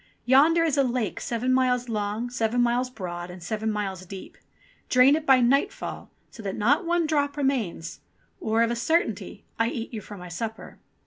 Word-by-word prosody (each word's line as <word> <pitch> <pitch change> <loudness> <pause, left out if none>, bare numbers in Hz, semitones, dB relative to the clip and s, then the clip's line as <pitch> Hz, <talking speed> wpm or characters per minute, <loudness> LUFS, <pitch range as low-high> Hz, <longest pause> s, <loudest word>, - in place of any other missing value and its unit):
Yonder 305 +6 +5
is 315 -4 +1
a - - +5
lake 240 -6 -1
seven 245 +2 -1
miles 250 -1 +2
long, 215 +1 -2
seven 240 -1 -1
miles 245 +1 +2
broad, 175 -6 -6
and 180 -1 -10
seven 220 +4 -2
miles 195 -3 -3
deep. 185 +1 -10 0.5
Drain 255 +3 +6
it 315 0 -4
by 265 -1 +7
nightfall, 275 - 0 0.2
so 225 - -11
that 195 -2 -4
not 285 - +2
one 345 -1 +2
drop 290 -2 0
remains, 240 - -2 0.4
or, 225 +1 +2
of 230 - +1
a - - 0
certainty, 320 +8 -1
I 230 - +3
eat 230 +1 -5
you 220 - -4
for 195 -4 -10
supper." 220 +6 -6
240 Hz, 180 wpm, -26 LUFS, 210-270 Hz, 0.5 s, by